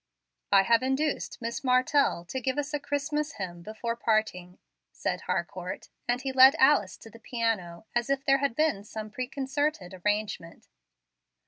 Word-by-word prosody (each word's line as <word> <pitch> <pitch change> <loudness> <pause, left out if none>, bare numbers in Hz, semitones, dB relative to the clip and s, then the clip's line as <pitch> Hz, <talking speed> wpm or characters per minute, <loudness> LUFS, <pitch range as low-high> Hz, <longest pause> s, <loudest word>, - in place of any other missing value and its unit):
"I 195 -1 +6
have 230 +3 +4
induced 265 +3 -1
Miss 235 +6 -3
Martell 255 - +2
to 260 +8 -4
give 260 +2 -1
us 290 +1 -2
a 295 - 0
Christmas 295 +2 -2
hymn 175 -3 -6
before 220 +4 -4
parting," 215 -6 -1 0.3
said - - -3
Harcourt; - - -3 0.2
and 245 +2 0
he 270 - -1
led 265 +1 +8
Alice 265 -9 +4
to 225 - -13
the 230 - -14
piano, 220 -7 -2
as 240 +1 0
if 275 0 0
there 275 0 +4
had 275 -4 0
been 305 -10 +1
some 215 0 -7
preconcerted 265 -4 -2
arrangement. 205 -5 -2
245 Hz, 155 wpm, -28 LUFS, 210-275 Hz, 0.3 s, led